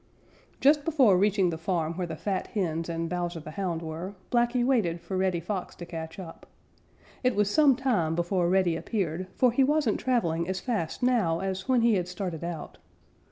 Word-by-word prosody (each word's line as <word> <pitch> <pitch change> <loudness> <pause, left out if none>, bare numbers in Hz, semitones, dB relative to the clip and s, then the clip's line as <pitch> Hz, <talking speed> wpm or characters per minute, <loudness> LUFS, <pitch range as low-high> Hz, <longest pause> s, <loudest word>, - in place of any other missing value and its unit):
_ - - -34
Just 290 +1 +4
before 275 - +4
reaching 195 -1 +2
the 160 - -5
farm 165 -2 -1
where 180 +1 -3
the 160 - -5
fat 190 +3 -2
hens 165 -5 -2
and 165 0 -2
Bowser 175 -1 -3
the 155 0 -9
Hound 170 -2 -3
were, 165 +5 -6 0.2
Blacky 240 0 +2
waited 210 -11 +1
for 190 +3 -6
Reddy 185 -2 +1
Fox 185 +2 -4
to 175 - -8
catch 160 -1 -7
up. 175 -4 -10 0.8
It 250 0 +2
was 205 0 +2
some 290 -1 +5
time 215 - 0
before 175 +1 +1
Reddy 185 -2 +3
appeared, 185 -1 -2
for 250 -2 +4
he 265 +3 +3
wasn't 290 -5 +2
traveling 170 -10 0
as 190 0 -1
fast 210 -5 -3
now 215 -10 +2
as 190 +3 -4
when 255 -2 +4
he 230 0 +4
had 180 -1 -2
started 180 -3 -5
out. 170 -3 -6
185 Hz, 195 wpm, -28 LUFS, 170-230 Hz, 0.8 s, some